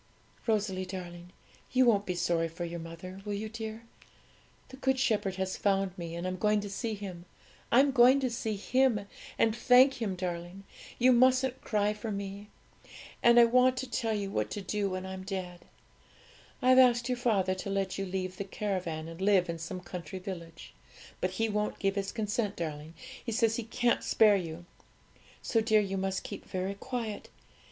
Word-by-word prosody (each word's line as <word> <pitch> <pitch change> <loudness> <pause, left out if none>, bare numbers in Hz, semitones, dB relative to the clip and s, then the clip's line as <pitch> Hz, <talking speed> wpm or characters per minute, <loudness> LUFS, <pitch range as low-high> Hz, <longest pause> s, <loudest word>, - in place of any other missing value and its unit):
'Rosalie, 205 -4 0
darling, 175 -2 -8 0.4
you 255 0 +4
won't 205 -4 +3
be 180 - -1
sorry 170 -1 +1
for 165 +2 -6
your 170 0 -5
mother; 165 +3 -9
will 205 0 -3
you, 215 +2 -4
dear? 220 0 -6 0.9
The 265 - -11
Good 265 -1 +1
Shepherd 215 -7 +1
has 190 0 -2
found 195 -2 +1
me, 170 -2 -6
and 170 +1 -4
I'm 185 0 -2
going 210 +2 +2
to 205 -1 -6
see 220 +2 -3
Him. 185 -4 -8 0.5
I'm 270 +4 +5
going 255 +1 +6
to 260 - +1
see 220 -2 -2
Him, 250 +1 +2 0.4
and 225 -1 +3
thank 255 +2 +5
Him, 200 -4 -1
darling; 180 +1 -5 0.3
you 255 +1 +5
mustn't 255 +1 +3
cry 210 -1 +1
for 210 +1 -6
me. 200 +1 -6 0.7
And 235 0 +7
I 235 - +9
want 255 +2 +4
to 260 - -3
tell 225 -2 -1
you 200 -1 -3
what 105 - -1
to 205 - -4
do 200 +1 -1
when 185 0 -4
I'm 190 0 -6
dead. 185 -2 -6 1.0
I've 255 +1 +6
asked 245 -1 +5
your 250 -1 -1
father 195 -6 +2
to 190 +1 -5
let 195 -1 -1
you 195 - -2
leave 185 0 -3
the - - -3
caravan, 185 -5 -3
and 165 +2 -9
live 190 -3 +3
in 165 - -7
some 180 +3 -6
country 180 -1 -7
village; 175 -3 -8 0.5
but 185 - 0
he 225 - +2
won't 210 0 -1
give 195 -1 0
his 195 0 -2
consent, 210 -1 -2
darling; 155 -1 -5 0.3
he 235 - -4
says 225 0 +2
he 240 - -3
can't 235 +2 0
spare 215 -2 +5
you. 170 -2 -4 0.8
So, 225 - +2
dear, 220 -1 +4
you 195 -2 -1
must 190 0 -2
keep - - -7
very 185 +1 -3
quiet. 225 0 -5
200 Hz, 185 wpm, -30 LUFS, 185-230 Hz, 1.0 s, I